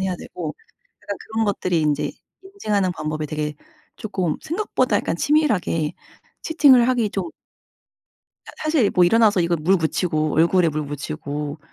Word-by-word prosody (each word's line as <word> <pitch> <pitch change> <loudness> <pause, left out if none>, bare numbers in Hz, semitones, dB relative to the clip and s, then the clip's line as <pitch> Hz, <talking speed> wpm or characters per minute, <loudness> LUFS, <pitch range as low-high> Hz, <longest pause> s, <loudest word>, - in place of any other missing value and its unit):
해야 190 -1 -1
되고, 160 -3 -7 0.5
약간 200 - -5
그런 220 0 -2
것들이 185 -4 0
인제 150 -1 0 0.3
인증하는 210 - -1
방법이 155 -1 -4
되게 150 0 -3 0.4
쪼금 185 -7 -2
생각보다 360 +7 0
약간 - - -1
치밀하게 205 - +1 0.5
채팅을 275 -7 +5
하기 235 -5 +1
좀 185 -4 -3 1.2
사 - - -10
사실 310 -9 +2
뭐 180 - +4
일어나서 210 0 +4
이거 170 0 +1
물 180 +5 +2
묻이고 160 -2 0
얼굴에 170 +2 +4
물 155 0 -2
묻히고 145 +1 -5
180 Hz, 310 characters per minute, -22 LUFS, 155-220 Hz, 1.2 s, 채팅을